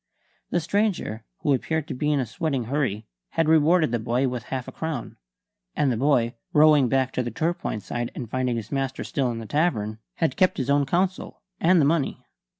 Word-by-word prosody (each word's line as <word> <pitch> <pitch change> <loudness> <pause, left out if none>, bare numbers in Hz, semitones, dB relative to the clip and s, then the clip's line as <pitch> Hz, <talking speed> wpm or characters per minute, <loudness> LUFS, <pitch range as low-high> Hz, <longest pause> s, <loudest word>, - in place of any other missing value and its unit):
The 175 - +1
stranger, 180 - -1 0.2
who 145 - +2
appeared 160 +3 -1
to - - -4
be 150 +4 0
in 145 - +2
a 130 - 0
sweating 135 +3 -2
hurry, 115 -4 -1 0.3
had 165 -1 +1
rewarded 160 -1 +4
the 120 - 0
boy 120 +4 0
with 125 -2 -4
half 130 -2 -4
a - - -6
crown; 160 -6 -4 0.6
and 140 -3 +2
the - - 0
boy, 120 -2 +2 0.2
rowing 150 -4 +6
back 130 0 +1
to - - 0
the 120 - -3
Torpoint 155 - -2
side 120 0 -3
and 120 - -5
finding 125 +1 -1
his 110 -3 -5
master 135 -1 -2
still 140 -6 -1
in 115 - -3
the 115 - -6
tavern, 110 - 0 0.2
had 160 -6 0
kept 185 - +3
his 135 0 0
own 140 -1 +3
counsel 185 +5 -1 0.2
and 175 +1 +4
the 145 - +4
money. 150 -1 0
135 Hz, 205 wpm, -25 LUFS, 120-160 Hz, 0.6 s, rowing